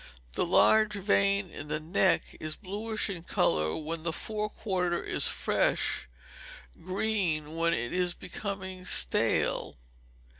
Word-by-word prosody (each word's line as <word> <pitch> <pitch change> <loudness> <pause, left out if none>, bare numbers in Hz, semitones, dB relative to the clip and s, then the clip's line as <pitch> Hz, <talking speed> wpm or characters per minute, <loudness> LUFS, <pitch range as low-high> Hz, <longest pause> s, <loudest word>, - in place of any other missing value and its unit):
The - - 0
large 215 +4 +5
vein 200 -1 +2
in 145 - -8
the 150 +1 -2
neck 175 +4 +1
is 155 0 -3
bluish 215 +3 -3
in 190 -5 -5
colour 80 - +1
when 160 +1 -4
the 165 +1 -1
fore 210 +5 -3
quarter 180 -5 -1
is - - +2
fresh, - - 0 0.8
green 185 -6 -1
when 170 0 +2
it 120 +1 -3
is 180 -1 +1
becoming 190 -2 -6
stale. 60 - +1
185 Hz, 125 wpm, -29 LUFS, 160-200 Hz, 0.8 s, large